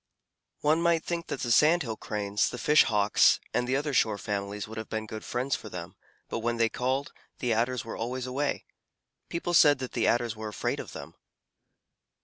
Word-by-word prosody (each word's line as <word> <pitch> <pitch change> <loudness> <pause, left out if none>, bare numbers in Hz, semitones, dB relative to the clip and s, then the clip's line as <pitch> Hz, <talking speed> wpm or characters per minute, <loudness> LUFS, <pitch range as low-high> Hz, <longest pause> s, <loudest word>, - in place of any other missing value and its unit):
One 155 +2 +3
might 170 -1 +2
think 170 -1 -3
that - - -4
the 120 - -1
Sand 155 +8 +5
Hill 115 -3 -4
Cranes, 105 -1 -1
the 125 - -6
Fish 150 +5 +5
Hawks, 105 -1 +4
and 125 - 0
the 130 - +1
other 145 +1 -1
shore 110 -4 +2
families 100 0 -4
would 110 +1 -7
have 110 - -7
been 110 -1 -3
good 110 0 -7
friends 130 +2 -1
for 110 - -8
them, 85 -3 -7 0.3
but - - -3
when 120 +1 -1
they 115 -1 +3
called, 130 +4 -2 0.2
the 120 -2 0
Adders 120 +1 0
were 115 - -6
always 125 +2 -3
away. 140 +3 -2 0.6
People 170 +1 -3
said 145 -4 +6
that 130 -1 -6
the - - 0
Adders 120 -2 +1
were 110 0 -6
afraid 105 - -2
of - - -7
them. - - -9
120 Hz, 200 wpm, -28 LUFS, 110-140 Hz, 0.6 s, said